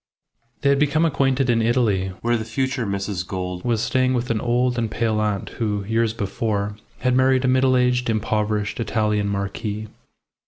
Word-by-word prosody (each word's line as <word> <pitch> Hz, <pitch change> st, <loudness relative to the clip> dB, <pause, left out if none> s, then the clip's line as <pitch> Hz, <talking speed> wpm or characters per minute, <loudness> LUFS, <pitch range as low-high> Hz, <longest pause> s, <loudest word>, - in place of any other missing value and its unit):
They 140 Hz, -, +3 dB
had 140 Hz, 0 st, +3 dB
become 150 Hz, +3 st, +2 dB
acquainted 135 Hz, -3 st, +1 dB
in 115 Hz, -2 st, +2 dB
Italy, 110 Hz, -5 st, +2 dB, 0.2 s
where 120 Hz, 0 st, +2 dB
the 110 Hz, -, -2 dB
future 125 Hz, +1 st, -2 dB
Mrs. 100 Hz, -2 st, -2 dB
Gould 90 Hz, -2 st, -4 dB
was 115 Hz, -3 st, 0 dB
staying 130 Hz, -1 st, +1 dB
with 120 Hz, 0 st, -1 dB
an 110 Hz, -, 0 dB
old 125 Hz, 0 st, +1 dB
and 115 Hz, -1 st, -1 dB
pale 110 Hz, -1 st, 0 dB
aunt 105 Hz, -2 st, -1 dB
who, 105 Hz, -2 st, 0 dB
years 115 Hz, +1 st, +1 dB
before, 105 Hz, -1 st, -2 dB, 0.3 s
had 125 Hz, -1 st, +2 dB
married 130 Hz, 0 st, +3 dB
a -, -, +3 dB
middle 130 Hz, 0 st, +3 dB
aged, 125 Hz, -1 st, +1 dB
impoverished 105 Hz, -1 st, -1 dB
Italian 105 Hz, -2 st, 0 dB
marquis. 100 Hz, +2 st, -3 dB
115 Hz, 170 wpm, -22 LUFS, 105-125 Hz, 0.3 s, They